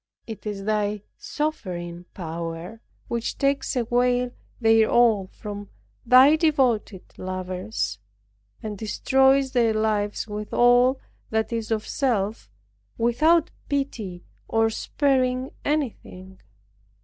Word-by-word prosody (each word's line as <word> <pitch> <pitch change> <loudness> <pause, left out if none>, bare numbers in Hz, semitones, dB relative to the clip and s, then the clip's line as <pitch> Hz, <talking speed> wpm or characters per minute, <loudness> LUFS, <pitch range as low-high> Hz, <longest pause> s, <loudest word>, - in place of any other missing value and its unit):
It 220 -1 -8
is 200 -2 -4
Thy 210 -1 -1
sovereign 175 - -4
power 170 +4 -6 0.3
which 235 -1 -3
takes 275 0 0
away 245 +1 +1 0.3
their 225 -1 +4
all 225 -5 +4
from 205 +1 -8 0.4
Thy 260 +5 +7
devoted 255 - +1 0.2
lovers; 185 - -4 0.6
and 210 -2 -5
destroys 265 +4 +3
their 230 -3 +2
lives 215 -1 0
with 210 0 -5
all 245 +2 +5 0.3
that 220 +1 -1
is 225 -1 -3
of 220 -1 -1
self 215 - -1 0.5
without 310 +8 +3 0.2
pity 230 -11 -3 0.2
or 225 0 +2
sparing 255 +1 0
anything. 210 -10 -3
225 Hz, 100 wpm, -24 LUFS, 205-255 Hz, 0.6 s, Thy